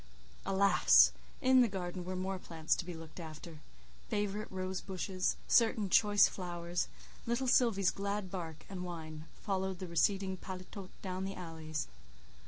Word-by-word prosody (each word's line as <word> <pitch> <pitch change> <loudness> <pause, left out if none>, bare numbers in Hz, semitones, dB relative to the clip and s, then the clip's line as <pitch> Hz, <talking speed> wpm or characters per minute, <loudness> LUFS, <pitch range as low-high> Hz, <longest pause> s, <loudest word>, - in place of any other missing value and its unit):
Alas! 195 +1 +6 0.3
in 260 -1 +6
the 240 - +5
garden 180 -3 -4
were 185 +1 -4
more 190 +1 -2
plants 160 -3 -1
to 175 - -4
be 175 -1 -6
looked 160 +1 -10
after,—favourite 160 - -6
rose 185 -1 -3
bushes, 185 -1 -1
certain 220 -4 +3
choice 205 +1 +6
flowers; 175 -1 -3 0.4
little 240 +3 0
Sylvie's 230 -7 +4
glad 200 -1 -3
bark 160 -4 -6
and 185 -2 -6
whine 160 -3 -7 0.2
followed 190 -2 -1
the 185 - -5
receding 190 +2 +1
paletôt 185 +1 -8
down 185 -1 -3
the 195 0 -4
alleys. 160 -3 -5
185 Hz, 140 wpm, -34 LUFS, 170-200 Hz, 0.4 s, Alas